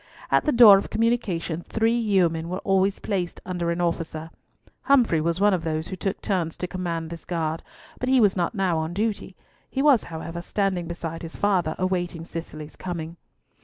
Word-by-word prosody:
At - - +3
the 300 - +3
door 225 -6 +9
of - - -6
communication 200 -8 0
three 225 +5 0
yeomen 180 -8 +1
were 185 - -2
always 195 0 +2
placed 185 -4 -3
under 175 -2 -2
an 170 +1 -1
officer. 165 -2 -2 0.5
Humfrey 240 - +4
was 170 +2 0
one 205 0 +4
of 175 -3 -1
those 160 0 -2
who 190 - -4
took 195 +2 -3
turns 175 -5 -1
to 180 - -3
command 170 -3 -4
this 170 -1 -7
guard, 165 -2 -2 0.4
but 255 - -2
he 260 -1 +5
was 205 -4 +4
not 180 +4 -1
now 185 -5 +1
on 160 +2 -3
duty. 215 +1 -2 0.3
He 270 - -1
was, 280 -7 +5
however, 165 +1 -6
standing 190 -2 -1
beside 165 -1 -5
his 165 -1 -8
father 180 -6 +1
awaiting 175 -3 -2
Cicely's 155 -2 -7
coming. 170 -2 -6
175 Hz, 185 wpm, -25 LUFS, 165-200 Hz, 0.5 s, door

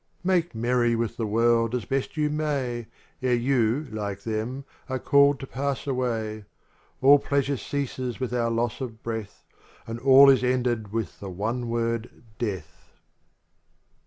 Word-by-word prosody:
Make 175 -6 +1
merry 120 +1 +2
with 115 -1 -2
the 115 - -1
world 115 +2 +2
as 120 - -3
best 135 +3 -2
you 150 -1 +1
may, 135 -7 -2 0.3
Ere 125 -1 +2
you, 125 +2 +1
like 100 -2 -4
them, 115 +5 -3 0.2
are 130 - -1
called 140 +1 +4
to - - -6
pass 135 +1 -3
away. 115 -5 -2 0.6
All 140 +2 +8
pleasure 140 0 0
ceases 130 -2 -4
with 130 -2 -3
our 120 -1 +1
loss 115 +2 -1
of 115 -4 -6
breath, 110 -3 -5 0.4
And 115 +1 -5
all 135 +2 +8
is 130 - +2
ended 120 -4 0
with 110 -5 -3
the 100 - -6
one 115 +6 -3
word 115 0 -2 0.2
DEATH. 105 -6 -5
120 Hz, 150 wpm, -26 LUFS, 115-135 Hz, 0.6 s, All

